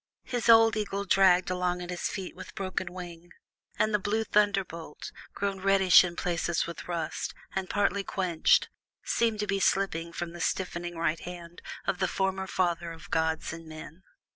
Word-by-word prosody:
His 245 -3 -2
old 225 -1 +7
eagle 200 -1 -2
dragged 185 -2 +4
along 180 -1 0
at 180 0 -6
his 175 - -2
feet 190 -2 -6
with - - -10
broken 185 -3 -3
wing, 175 -1 -9 0.5
and 215 - +1
the 210 - +3
blue 210 +3 0
thunderbolt, 195 -8 -1 0.2
grown 200 -1 -2
reddish 195 -1 +6
in 175 -1 -4
places 170 -1 0
from 170 - -5
rust, 170 -3 -3 0.2
and 190 -1 -2
partly 200 -1 +1
quenched, 180 -5 +2 0.3
seemed 225 -2 +1
to - - 0
be 195 -1 0
slipping 170 -4 +1
from 170 0 -5
the 175 - -8
stiffening 175 -2 -2
right 165 0 0
hand 175 -1 -9 0.2
of 180 - -1
the 190 - +2
former 190 +1 -1
father 170 -3 -1
of 165 +4 -12
gods 160 0 0
and 165 0 -9
men. 155 +2 -10
180 Hz, 170 wpm, -29 LUFS, 170-195 Hz, 0.5 s, old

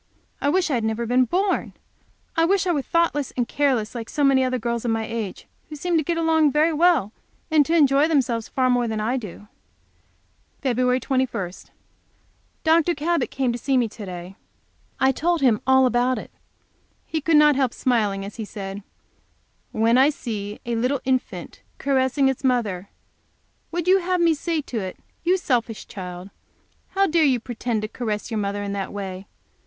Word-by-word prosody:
I 285 - +2
wish 355 0 +1
I - - +1
had 235 -3 0
never 220 +1 -1
been 250 +2 +3
born! 375 - 0 0.6
I 325 - +3
wish 390 +3 +2
I 360 - +2
were 295 -4 0
thoughtless 315 -3 0
and 245 -2 0
careless, 260 -7 0
like 230 -2 -6
so 290 - -1
many 270 -1 +4
other 255 0 0
girls 235 -1 -2
of 240 - -1
my 225 -1 0
age, 220 -4 -5 0.2
who 305 - -7
seem 345 +4 -1
to 315 - +3
get 335 +3 -1
along 320 -2 +3
very 310 +4 +3
well, 310 - +3 0.4
and 310 -2 +5
to 330 - +2
enjoy 285 -1 +4
themselves 250 -8 0
far 260 -1 +1
more 245 -1 +2
than 220 -1 -2
I 225 +4 0
do. 210 -3 -8 1.2
Feb. 250 -1 +2
21. 255 -9 -1 1.1
Dr. 330 +1 +3
Cabot 335 +3 0
came 260 -2 0
to 240 - -4
see 270 0 +1
me 240 -2 +2
to 215 0 -10
day. 180 +1 -8 0.6
I 265 0 +4
told 335 +4 0
him 240 -6 +3
all 265 0 +5
about 250 +1 +2
it. - - -8 0.7
He 315 - -3
could 320 +1 +3
not 300 -1 +6
help 260 -3 +1
smiling 210 -7 0
as 200 +2 -9
he 225 - -4
said: 200 -1 -7 0.9
"When 230 +3 +3
I 270 +3 +6
see 210 -8 -5
a 235 0 -1
little 250 +4 0
infant 260 -1 -2 0.2
caressing 270 0 +1
its 265 0 -1
mother, 210 -8 0 0.8
would 345 0 -3
you 380 +1 +6
have 365 0 0
me 335 -1 +4
say 320 +1 -2
to 245 -5 -4
it, 185 -2 -5 0.3
'You 360 +2 +3
selfish 240 - -1
child, 180 0 -8 0.6
how 390 0 +4
dare 335 -2 +2
you 265 -4 +3
pretend 235 -2 -3
to - - -2
caress 220 -1 -4
your 220 - -1
mother 205 0 -2
in 200 0 -3
that 195 -1 -3
way? 195 -1 -6
255 Hz, 185 wpm, -23 LUFS, 220-305 Hz, 1.2 s, not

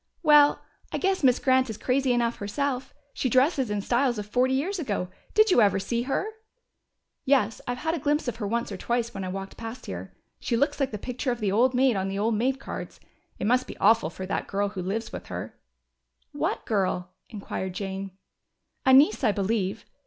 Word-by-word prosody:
"Well, 295 -2 +6 0.3
I - - -1
guess 380 -3 0
Miss 255 -2 +5
Grant 260 -1 +2
is 220 - -5
crazy 265 0 +1
enough 235 -1 +1
herself. 260 +5 -2 0.2
She 260 - -1
dresses 265 0 +3
in 210 -1 -1
styles 240 +3 +1
of 210 - -4
forty 255 +5 +1
years 360 +8 -1
ago. 205 - -2 0.3
Did 430 -1 +5
you 245 - +6
ever 200 -2 +4
see 235 +5 -1
her?" 330 - 0 1.0
"Yes, 255 -6 +2
I've 245 0 -2
had 320 +5 -1
a 335 - -2
glimpse 295 +1 0
of 235 -2 -2
her 210 -3 -3
once 235 +1 -1
or 195 - -4
twice 235 +2 -1
when 195 - -5
I - - -3
walked 195 +1 -6
past 230 +2 -7
here. - - -7 0.2
She 235 - -1
looks 285 +4 +1
like 275 -2 +1
the 210 - -5
picture 250 +4 -3
of 240 - -3
the 205 -4 0
old 250 +5 +3
maid 255 -2 +4
on 190 0 -1
the 195 0 -3
old 220 +3 +1
maid 255 +5 0
cards. - - -7 0.4
It - - -3
must 250 +3 +2
be - - -8
awful 220 -5 +4
for 185 +3 -7
that 190 - -3
girl 200 +1 0
who 195 -2 -5
lives 215 +5 -3
with - - -7
her." - - -7 0.7
"What - - -2
girl?" 185 -3 -1 0.2
inquired 195 -4 -5
Jane. 195 -1 -5 0.7
"A 260 - +7
niece, 265 -3 +6
I 220 - +4
believe. 200 -1 -1
235 Hz, 210 wpm, -26 LUFS, 200-265 Hz, 1.0 s, A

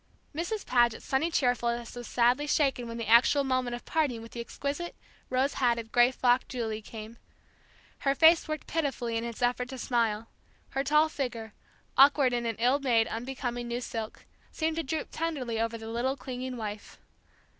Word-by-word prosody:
Mrs. 350 +8 -3
Paget's 240 -2 +2
sunny 275 +5 +1
cheerfulness 240 -5 0
was 240 -2 -7
sadly 250 +5 +2
shaken 270 -5 +1
when 230 0 -6
the 230 - -3
actual 240 +6 +5
moment 255 -2 0
of 240 - -10
parting 290 -8 0
with 230 - -11
the 235 - -7
exquisite, 285 +8 -4 0.3
rose 260 +2 +1
hatted, 235 -3 0
gray 240 0 +6
frocked 250 0 +2
Julie 220 -3 -3
came; 220 +1 -9 0.8
her 275 -1 +1
face 325 +2 +6
worked 310 -1 -4
pitifully 270 -7 -2
in 225 - -1
its 235 +1 -5
effort 250 +1 0
to 265 - -6
smile; 230 -3 0 0.4
her 270 0 -1
tall 300 +3 +4
figure, 240 -8 -4 0.5
awkward 275 -2 +6
in 240 -1 -1
an 225 - -2
ill 250 +5 +3
made 240 -5 +3
unbecoming 245 0 -4
new 235 +1 -2
silk, 225 -3 -6 0.3
seemed 320 0 -1
to - - +1
droop 315 +1 -3
tenderly 265 -9 -2
over 230 0 -1
the 225 0 -9
little 245 +4 -1
clinging 255 0 -5
wife. 210 -2 -6
245 Hz, 175 wpm, -29 LUFS, 235-275 Hz, 0.8 s, gray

